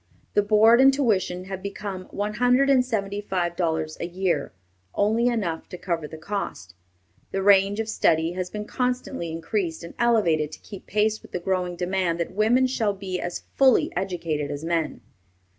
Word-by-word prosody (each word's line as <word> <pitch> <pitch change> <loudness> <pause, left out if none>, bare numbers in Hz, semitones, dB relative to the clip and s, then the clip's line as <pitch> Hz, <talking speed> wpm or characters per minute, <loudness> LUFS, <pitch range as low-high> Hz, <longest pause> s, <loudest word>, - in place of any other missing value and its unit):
The 205 - +4
board 220 +4 +5
and 270 +1 +8
tuition 205 -9 0
have 190 0 -6
become 200 -1 -5
one 205 +1 -3
hundred 250 +4 +3
and 260 -2 +5
seventy 205 -5 -2
five 180 -4 -2
dollars 160 -3 -1
a 170 - -3
year, 175 -4 -1 0.4
only 220 +4 +2
enough 200 -9 -2
to 180 - -7
cover 170 -4 -3
the 160 - -9
cost. 160 - -5 0.6
The 195 0 -2
range 200 +1 +5
of 225 - -1
study 165 -6 +2
has 180 0 -4
been 210 +1 -5
constantly 250 -9 -2
increased 165 0 -3
and 170 - -9
elevated 170 -11 +2
to - - -9
keep 200 -3 -11
pace 215 +1 +1
with - - -16
the 180 - -1
growing 180 0 -1
demand 180 -1 -1
that 170 - -2
women 225 +6 +3
shall 225 -6 0
be 190 -2 -4
as 175 - -4
fully 265 -3 +4
educated 170 -6 -2
as 145 +2 -5
men. 165 -2 -1
190 Hz, 175 wpm, -25 LUFS, 170-215 Hz, 0.6 s, and